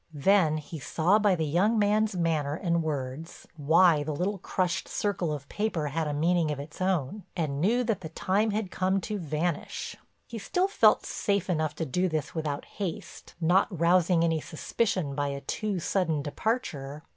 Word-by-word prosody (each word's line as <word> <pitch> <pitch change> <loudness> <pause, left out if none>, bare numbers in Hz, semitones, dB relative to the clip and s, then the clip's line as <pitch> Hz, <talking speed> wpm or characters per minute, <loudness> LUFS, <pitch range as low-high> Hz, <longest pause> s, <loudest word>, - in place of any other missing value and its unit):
Then 160 +1 +3
he 155 +1 -7
saw 175 +8 +2
by 205 -3 +3
the 160 -2 -1
young 185 +10 +2
man's 210 0 +2
manner 155 -4 0
and 170 0 0
words 150 0 -5
why 160 +1 +4
the 150 0 -3
little 190 +5 -1
crushed 180 0 -1
circle 185 -6 -1
of 140 -2 -5
paper 175 -8 -2
had 160 +2 -1
a - - -1
meaning 165 +2 +1
of 150 -2 -3
its 150 +5 -9
own, 185 0 0 0.2
and 145 -4 -1
knew 235 +8 +3
that 225 -5 -1
the 160 - -6
time 195 +6 0
had 210 -2 -2
come 190 +1 +1
to 210 +3 -4
vanish. 160 0 -3 0.3
He 230 - -7
still 360 - 0
felt 400 - +4
safe 200 -3 -1
enough 155 -3 -1
to 165 - -2
do 180 +7 0
this 155 -2 -3
without 150 -3 -3
haste, 190 -6 -6
not 175 +4 +3
rousing 175 0 +3
any 165 -2 +1
suspicion 170 -2 -1
by 145 0 -1
a 140 0 -4
too 205 +8 -2
sudden 160 -4 0
departure. 150 - -3
170 Hz, 180 wpm, -28 LUFS, 150-195 Hz, 0.3 s, why